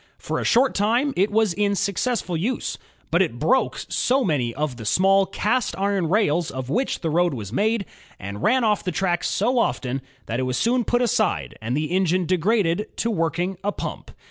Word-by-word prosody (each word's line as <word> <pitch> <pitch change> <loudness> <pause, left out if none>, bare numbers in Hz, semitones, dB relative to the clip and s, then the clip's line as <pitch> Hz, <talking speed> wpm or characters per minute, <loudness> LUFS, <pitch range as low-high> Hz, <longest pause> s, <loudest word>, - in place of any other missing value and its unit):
For - - -3
a - - -2
short 255 +3 +3
time 235 +8 +1
it 195 +3 +2
was 215 -3 +2
in 200 +1 +1
successful 200 -1 -1
use. 210 +11 -2 0.3
But - - +3
it - - 0
broke - - +1
so 265 +2 +1
many 140 - 0
of 145 0 -3
the 115 - -8
small 195 - +3
cast 235 +3 -1
iron 195 -4 0
rails 175 -5 +2
of 130 0 -5
which 255 +5 -1
the 160 - -1
road 175 -1 +2
was 105 -5 -7
made, 215 0 +1 0.3
and 100 +2 -7
ran 255 - +3
off 210 -2 +1
the 180 - -2
track 180 -3 0
so 240 +5 +1
often, 135 - -1 0.2
that 115 +5 -3
it 130 0 -1
was 125 - -1
soon 240 - +1
put 245 0 +1
aside 230 -2 0
and 120 +5 -2
the 155 +1 -2
engine 185 -1 +1
degraded 185 +1 +1
to 230 - 0
working 175 0 -1
a 205 - 0
pump. - - -6
190 Hz, 195 wpm, -23 LUFS, 160-220 Hz, 0.3 s, short